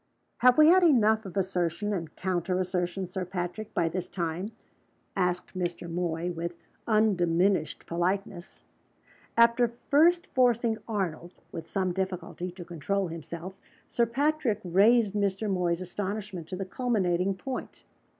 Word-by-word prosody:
"Have 250 0 +6
we 310 +1 +8
had 370 +2 +7
enough 220 - +4
of 190 - -8
assertion 185 +1 -1
and 165 -5 -4
counter 185 0 -1
assertion, 185 0 -2
Sir 185 +1 -4
Patrick, 180 +3 -4
by 170 - +2
this 180 +2 -3
time?" 175 +3 -3 0.6
asked 180 -1 -1
Mr. 175 -1 -3
Moy, 170 0 -2
with 170 0 -4 0.3
undiminished 185 -6 +2
politeness. 175 +1 -3 0.7
After 235 0 +4 0.2
first 340 +4 +5
forcing 235 -3 +2
Arnold 180 -5 -3 0.2
with 165 0 -7
some 190 -2 -1
little 190 +2 +1
difficulty 180 -1 -6
to 175 0 -10
control 175 +3 -2
himself, 170 +3 -7 0.3
Sir 235 -1 +1
Patrick 270 -3 +1
raised 205 +4 +4
Mr. 200 0 0
Moy's 180 -3 0
astonishment 190 -1 -4
to 185 - -5
the 195 +1 -4
culminating 190 -4 0
point. 260 +6 -6
185 Hz, 135 wpm, -28 LUFS, 175-215 Hz, 0.7 s, we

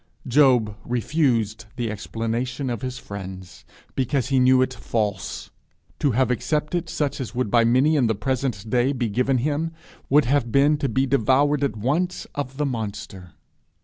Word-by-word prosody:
Job 125 -5 +4
refused 120 -4 0
the 120 -3 -2
explanation 115 +5 -3
of 120 - -4
his 130 -1 -4
friends 95 -3 -9 0.3
because 135 0 0
he 135 -1 +3
knew 130 0 +5
it - - -2
false; 105 -4 -3 0.5
to 145 - +2
have 130 +1 +2
accepted 155 +6 -1
such 145 -2 -2
as 125 -1 -6
would 125 -4 -1
by 120 -1 +5
many 130 +7 +3
in 130 -5 +3
the 110 - +1
present 115 -1 -2
day 125 +4 +2
be 125 -3 -1
given 125 +5 +1
him, 150 +5 -1 0.4
would 145 +1 +5
have 125 -2 +1
been 140 +4 +4
to 140 -2 -1
be 130 +4 +1
devoured 140 +3 +2
at 130 -6 -1
once 160 - -1
of 135 -2 -5
the 150 - 0
monster. 100 - -5
125 Hz, 165 wpm, -23 LUFS, 115-140 Hz, 0.5 s, knew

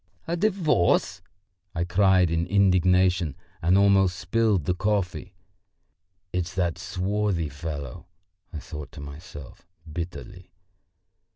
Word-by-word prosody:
"A 170 - -1
divorce!" 165 - +1 0.5
I 85 - 0
cried 90 -1 +3
in 85 0 0
indignation 90 -4 +3 0.3
and 90 +4 +4
almost 100 -2 +4
spilled 110 -5 +1
the 90 - +1
coffee. 95 -1 -2 1.0
"It's 90 -1 -2
that 85 -3 -1
swarthy 90 -1 -1
fellow," 75 +2 -7 0.4
I 80 - -6
thought 75 -1 -8
to - - -10
myself 70 +1 -10 0.2
bitterly. 90 +4 -7
90 Hz, 105 wpm, -25 LUFS, 85-100 Hz, 1.0 s, and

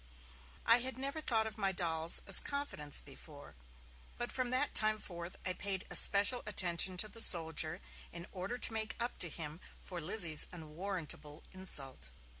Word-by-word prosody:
I 230 +1 +4
had 255 +1 -4
never 275 +4 -4
thought 225 -6 +2
of 220 0 -8
my 195 -2 0
dolls 165 -2 +5
as - - +6
confidants 280 - -5
before, 145 +1 -15 0.6
but 240 - -3
from 255 -2 -3
that 260 +3 -1
time 215 0 +1
forth 175 -3 -8
I 185 - -2
paid 190 0 -2
a - - -5
special 205 +5 +5
attention 185 -2 +1
to 215 - +2
the 230 +2 -6
soldier, 160 -2 +2 0.3
in 170 0 -7
order 195 +6 -6
to 240 - +5
make 220 0 -1
up 240 +1 -5
to 175 - +2
him 155 0 -7 0.2
for 180 -3 -8
Lizzie's 165 -2 +2
unwarrantable 160 -2 -7
insult. 140 - -1
185 Hz, 165 wpm, -33 LUFS, 165-220 Hz, 0.6 s, as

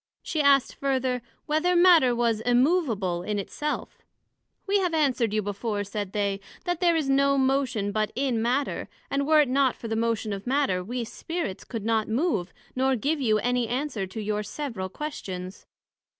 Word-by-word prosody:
she 315 - -1
asked 280 -2 +4
further, 260 -2 -1 0.2
Whether 315 +4 +1
Matter 345 -8 +6
was 230 -2 +1
immovable 245 - +2
in 210 +3 -2
it 200 - -5
self? 300 0 -4 0.7
We 405 0 +2
have 360 -4 0
answered 260 -7 +2
you 215 0 0
before, 205 +1 -2
said 205 -1 -4
they, 200 -1 -1 0.3
That 350 -2 -1
there 345 -2 +3
is 310 -4 0
no 275 +1 +3
motion 260 -6 +1
but 215 0 0
in 255 -4 0
Matter; 255 +5 -1 0.2
and 280 0 0
were 310 -1 +6
it 290 - +2
not 265 0 +2
for 230 - -8
the 225 - -2
motion 225 -2 0
of 200 +3 -7
Matter, 255 -9 +1
we 240 +5 -3
Spirits, 325 - -5
could 225 -4 -6
not 225 -1 +1
move, 220 - 0 0.2
nor 265 +1 +2
give 285 +6 -1
you 220 -4 +3
any 245 +2 0
answer 245 -5 -2
to 190 +4 -7
your 210 0 -1
several 210 -3 -5
questions. 190 -9 -6
245 Hz, 180 wpm, -26 LUFS, 210-280 Hz, 0.7 s, Matter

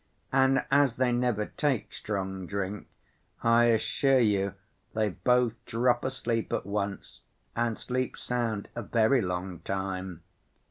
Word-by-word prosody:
And 135 0 +4
as 140 -3 +4
they 125 0 +2
never 120 -3 +1
take 140 -2 -1
strong 95 -3 -4
drink, 100 +1 -3 0.6
I 115 0 +5
assure 130 +4 +3
you 100 -5 +2 0.4
they 110 -1 +2
both 125 +3 +1
drop 120 +1 +1
asleep 120 -4 -2
at - - -1
once 100 -1 -4 0.3
and 115 -1 0
sleep 130 0 -2
sound 115 -4 -2
a 120 - -4
very 115 +4 +3
long 90 -2 -3
time. 95 -2 -4
115 Hz, 130 wpm, -29 LUFS, 100-125 Hz, 0.6 s, I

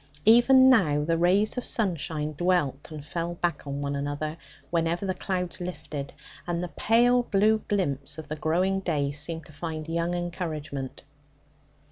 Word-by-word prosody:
Even 250 +4 +7
now 160 - +4
the 165 +2 +1
rays 190 +8 +2
of - - -6
sunshine 160 -7 -1
dwelt 165 -5 0
and 150 -2 -8
fell 170 +2 -3
back 170 -3 -2
on 140 0 -3
one 140 0 -2
another, 145 +2 -3 0.4
whenever 170 +2 0
the 190 - 0
clouds 180 -2 -3
lifted; 155 -5 -5 0.4
and 175 0 -1
the 180 - -4
pale 240 +9 +3
blue 215 -1 +2
glimpse 145 -8 -1
of 160 -1 -8
the 155 - -4
growing 180 +5 +1
day 150 -7 -1
seemed 150 +2 -3
to - - -15
find 155 +1 -5
young 170 +1 -1
encouragement. 160 -6 -5
170 Hz, 155 wpm, -27 LUFS, 150-185 Hz, 0.4 s, Even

